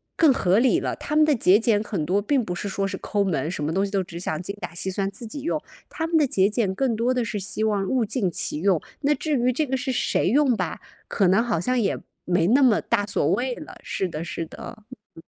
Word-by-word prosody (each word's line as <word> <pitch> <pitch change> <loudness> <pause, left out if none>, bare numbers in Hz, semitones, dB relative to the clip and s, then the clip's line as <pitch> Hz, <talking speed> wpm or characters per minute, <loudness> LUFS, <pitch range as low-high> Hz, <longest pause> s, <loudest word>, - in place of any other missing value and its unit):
更 315 -4 +5
合 195 -6 +2
理 255 -1 +3
了。 - - -2
他 300 - -4
们 310 - +6
的 300 -3 +3
节 205 -2 +4
俭 220 -2 +2
很 190 -8 -3
多 195 +5 +1
并 255 +3 +1
不 180 -3 -4
是 200 - -4
说 195 0 -1
是 - - -4
抠 205 -1 -1
门， 160 -5 -1
什 155 - -4
么 155 +2 -1
东 195 +2 +1
西 195 - -6
都 195 -1 +1
只 170 -1 -9
想 160 -3 -3
精 200 +2 -5
打 - - -5
细 190 +2 -2
算 195 +1 -1
自 230 - -8
己 285 +6 -7
用， 315 - -1 0.3
他 325 -1 -3
们 330 - -1
的 300 - +4
节 200 -6 +2
俭 210 -3 0
更 245 +1 0
多 240 +3 +1
的 250 -2 0
是 210 - -3
希 205 +2 -3
望 205 -3 +1
物 255 -3 +1
尽 210 -4 -1
其 150 - -2
用， 185 -4 +2 0.2
那 290 +1 +3
至 300 0 -1
于 250 0 +2
这 300 +5 0
个 265 - -1
是 265 +1 -2
谁 250 - 0
用 265 +3 +3
吧， 180 -5 -3 0.3
可 195 - +2
能 195 +6 +4
好 220 -9 0
像 255 +8 0
也 200 -4 0 0.3
没 175 -1 +2
那 260 +7 +4
么 240 -5 +5
大 205 - 0
所 175 -6 0
谓 250 +6 0
了， 305 - -10
是 190 - -2
的， 165 -1 -5
是 165 0 -4
的。 220 +7 -10 0.3
嗯。 165 - -12
205 Hz, 285 characters per minute, -24 LUFS, 185-255 Hz, 0.3 s, 们